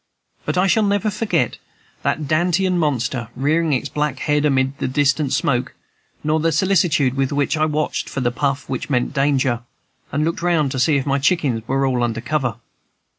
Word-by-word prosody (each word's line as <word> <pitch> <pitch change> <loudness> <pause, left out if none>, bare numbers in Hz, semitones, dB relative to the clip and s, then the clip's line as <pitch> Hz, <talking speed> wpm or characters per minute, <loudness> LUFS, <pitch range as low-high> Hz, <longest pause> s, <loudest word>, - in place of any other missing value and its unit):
But - - -1
I 180 - +4
shall 205 +3 +3
never 205 0 +1
forget 175 - -1 0.4
that 150 -2 -1
Dantean 175 +4 +1
monster, 125 -6 -1
rearing 155 +5 +1
its 140 0 0
black 150 -2 -2
head 150 +2 +1
amid 135 -1 +1
the - - -1
distant 145 +1 +1
smoke, 125 -2 0 0.5
nor 155 +1 +1
the 165 +1 +1
solicitude 160 -8 +2
with 135 -1 -1
which 145 0 0
I 155 0 +2
watched 155 0 -2
for - - -4
the 120 -1 +1
puff 140 +2 -2
which 130 - -4
meant 125 -1 0
danger, 135 -4 +1 0.5
and 150 +2 0
looked 165 +1 -2
round 165 -6 +1
to 130 - -3
see 145 +4 +3
if 135 - -2
my 140 0 +1
chickens 140 -6 +1
were 135 +1 +1
all 125 -2 0
under 115 -1 -1
cover. 125 -2 -1
145 Hz, 185 wpm, -20 LUFS, 130-160 Hz, 0.5 s, I